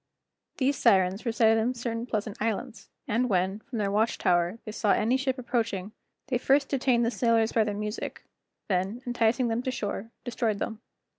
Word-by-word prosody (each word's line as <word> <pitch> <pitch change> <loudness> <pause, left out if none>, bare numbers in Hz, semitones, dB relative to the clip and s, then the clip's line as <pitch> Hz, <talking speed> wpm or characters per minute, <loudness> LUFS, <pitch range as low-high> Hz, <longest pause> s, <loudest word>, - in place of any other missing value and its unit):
These 275 +1 +1
Sirens 195 -1 +3
resided 225 -1 +4
in 245 +3 0
certain 235 0 -3
pleasant 215 -3 -3
islands, 230 +2 -3 0.2
and 245 +4 +1
when, 190 +1 +1
from 245 +1 -8
their 200 -2 0
watch 220 +3 +1
tower, 175 +1 +2
they 215 - -5
saw 210 -1 +2
any 225 +4 +2
ship 265 0 0
approaching, 225 -6 -2 0.4
they 250 -3 +1
first 275 +2 +3
detained 250 -3 +2
the 230 - +1
sailors 230 -2 +2
by 225 - +3
their 205 -1 -2
music, 210 +1 -5 0.4
then, 195 +5 -1
enticing 240 0 +1
them 230 +1 0
to 260 - -3
shore, 220 -3 -4
destroyed 235 -4 -1
them. 220 +2 -4
225 Hz, 175 wpm, -28 LUFS, 210-245 Hz, 0.4 s, resided